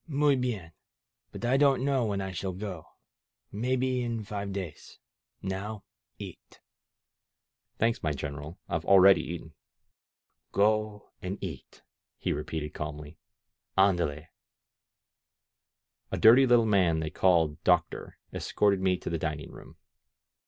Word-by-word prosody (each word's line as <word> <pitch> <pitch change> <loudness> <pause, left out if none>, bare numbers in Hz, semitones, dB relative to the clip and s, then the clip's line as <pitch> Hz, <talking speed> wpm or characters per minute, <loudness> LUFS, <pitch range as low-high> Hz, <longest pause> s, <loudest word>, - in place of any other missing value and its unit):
Muy 145 -2 +3
hien! 115 -10 -3 0.6
But - - -6
I 130 +3 +3
don't 135 -2 +3
know 135 -4 +1
when 100 -2 -1
I 95 0 -4
shall 95 +1 -4
go. 90 -4 -6 0.7
Maybe 125 +3 0
in 115 -2 -3
five 100 -1 -5
days. 95 -5 -7 0.5
Now 100 +2 -4 0.3
eat!" - - -11 1.2
"Thanks, 115 +1 +1
my 75 - 0
general, 75 +3 -6
I've - - -2
already 95 -2 +7
eaten." 80 -1 -7 1.0
Go 105 0 +1
and 95 +2 -4
eat," 80 -9 -8 0.3
he - - -1
repeated 75 -2 -4
calmly. 75 0 -7 0.6
AndaleV* 85 -6 +2 1.9
A - - -1
dirty 125 +4 +7
little 120 -2 +5
man 95 -6 +3
they 80 -1 -2
all - - -30
called 80 -5 +2
Doctor 90 -2 +1 0.2
escorted 100 -2 +1
me 95 -1 +2
to - - -6
the 85 - -1
dining 75 -2 -4
room. - - -13
95 Hz, 125 wpm, -29 LUFS, 80-110 Hz, 1.9 s, already